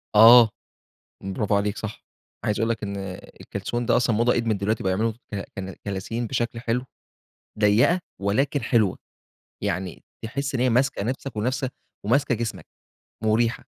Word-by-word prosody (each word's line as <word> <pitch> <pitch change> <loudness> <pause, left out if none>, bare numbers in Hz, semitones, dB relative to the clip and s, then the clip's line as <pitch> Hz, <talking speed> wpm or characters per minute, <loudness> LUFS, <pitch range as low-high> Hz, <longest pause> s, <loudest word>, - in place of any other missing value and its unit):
آه، 115 +1 +9 0.8
برافو 100 +1 0
عليك 100 +1 0
صح. 110 -1 -6 0.4
عايز 105 - 0
أقول 115 +1 +1
لك 115 -2 -2
إن 100 -1 -3 0.4
الكلسون 120 0 -3
ده - - +4
أصلًا 120 -3 +2
موضة 120 +2 +3
قِدمِت 115 -3 +1
دلوقتي 105 +3 -1
بقوا 95 - +1
يعملوا 110 +3 +1 0.2
ك - - -3 0.2
ك 95 -2 -6
كلاسين 105 +4 -3
بشكل 120 -1 -2
حلو، 120 +2 -1 0.8
ضيّقة 110 - +4 0.2
ولكن 135 +8 +1
حلوة. 110 -5 +2 0.7
يعني 95 -2 -3 0.2
تحِس 135 +4 -3
إن 120 - 0
هي 130 - +3
ماسكة 125 -3 +2
نفْسك 130 +1 -4
ونفس 130 +5 -1 0.4
وماسكة 125 +2 +2
جسمك، 115 0 -4 0.6
مُريحة. 115 +2 +1
115 Hz, 150 wpm, -24 LUFS, 105-120 Hz, 0.8 s, آه